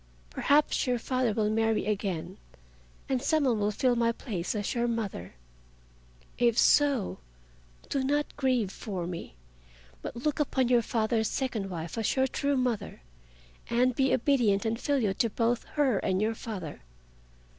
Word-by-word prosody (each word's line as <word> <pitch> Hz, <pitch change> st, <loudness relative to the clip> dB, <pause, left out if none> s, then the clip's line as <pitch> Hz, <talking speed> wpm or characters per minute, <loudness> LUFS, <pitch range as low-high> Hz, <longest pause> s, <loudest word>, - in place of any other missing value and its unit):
Perhaps 290 Hz, -, +2 dB
your 250 Hz, -1 st, +2 dB
father 255 Hz, 0 st, 0 dB
will 210 Hz, 0 st, 0 dB
marry 225 Hz, 0 st, +1 dB
again 190 Hz, -3 st, -2 dB, 0.7 s
and 260 Hz, -2 st, 0 dB
some 310 Hz, +2 st, +2 dB
one 240 Hz, -5 st, +2 dB
will 205 Hz, 0 st, +1 dB
fill 245 Hz, +4 st, +1 dB
my 230 Hz, -1 st, +2 dB
place 205 Hz, -6 st, -4 dB
as 205 Hz, -1 st, -2 dB
your 240 Hz, -1 st, 0 dB
mother. 205 Hz, -, -4 dB, 1.0 s
If 235 Hz, -2 st, +3 dB
so 280 Hz, -9 st, +3 dB, 0.7 s
do 275 Hz, -2 st, -1 dB
not 290 Hz, +2 st, 0 dB
grieve 255 Hz, -8 st, +1 dB
for 190 Hz, -5 st, -5 dB
me, 170 Hz, -, -7 dB, 0.7 s
but -, -, -6 dB
look 290 Hz, +6 st, -2 dB
upon 260 Hz, -4 st, +1 dB
your 245 Hz, -1 st, +5 dB
father's 220 Hz, 0 st, 0 dB
second 225 Hz, -7 st, -2 dB
wife 170 Hz, +2 st, -5 dB
as 220 Hz, -, 0 dB
your 265 Hz, 0 st, +3 dB
true 280 Hz, +1 st, 0 dB
mother, 245 Hz, -, -2 dB, 0.7 s
and 250 Hz, +2 st, +3 dB
be 265 Hz, 0 st, +2 dB
obedient 230 Hz, -7 st, +2 dB
and 225 Hz, +1 st, -1 dB
filial 260 Hz, -10 st, +1 dB
to 230 Hz, -, +1 dB
both 235 Hz, +2 st, 0 dB
her 270 Hz, -9 st, +2 dB
and 185 Hz, 0 st, 0 dB
your 215 Hz, +2 st, +1 dB
father. 195 Hz, -9 st, -7 dB
230 Hz, 155 wpm, -29 LUFS, 205-260 Hz, 1.0 s, your